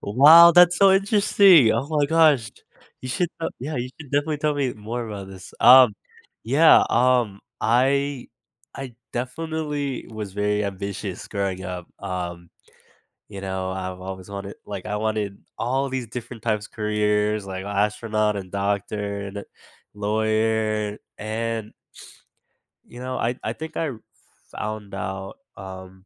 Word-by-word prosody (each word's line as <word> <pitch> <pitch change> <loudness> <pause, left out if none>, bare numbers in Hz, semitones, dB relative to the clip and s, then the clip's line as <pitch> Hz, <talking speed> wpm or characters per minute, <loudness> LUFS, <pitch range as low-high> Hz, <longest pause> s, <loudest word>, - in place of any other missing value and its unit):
Wow, 150 +10 +8
that's 175 0 +6
so 195 -1 +6
interesting. 195 - +5
Oh 120 +5 -1
my 150 -2 +1
gosh, 150 -8 +3 0.5
you 130 - -7
should, 175 +7 0
uh 165 - -1
Yeah, 150 +3 -4
you 125 +1 -3
should 145 -4 -11
definitely 145 +1 0
tell 150 0 0
me 135 -3 -1
more 115 +3 -5
about 100 -2 -7
this. 95 -1 -12
Um, 125 -4 +8 0.5
yeah, 145 +8 +6
um, 120 -6 +2 0.2
I 135 +3 +1 0.5
I 135 -3 -7 0.2
definitely 145 +1 -3
was 110 -3 -7
very 105 +1 0
ambitious 100 -1 -5
growing 100 -2 -3
up, 90 -2 -6
um, 90 -3 -5 0.8
you 100 -2 -9
know, 95 -1 -3
I've 95 -1 -5
always 95 0 -8
wanted 100 0 -7
like, 100 -2 -7
I 105 -1 -3
wanted 105 -2 -2 0.2
all 135 +3 -1
these 130 -2 -4
different 120 0 -8
types 105 -2 -1
of - - -37
careers, 105 -1 0
like 95 0 -6
astronaut 105 +1 0
and 95 -2 -8
doctor 100 0 -2
and 100 0 -7
a 100 - -7 0.5
lawyer, 110 0 0 0.2
and 110 0 -3 1.1
you 120 - -13
know, 130 0 -4
I 120 +2 -1
I - - -2
think 160 0 -8
I 160 - -1
r 120 -5 -8 0.5
found 105 -2 -6
out, 95 0 -5 0.2
um, 95 0 -10
110 Hz, 145 wpm, -23 LUFS, 100-130 Hz, 1.1 s, Wow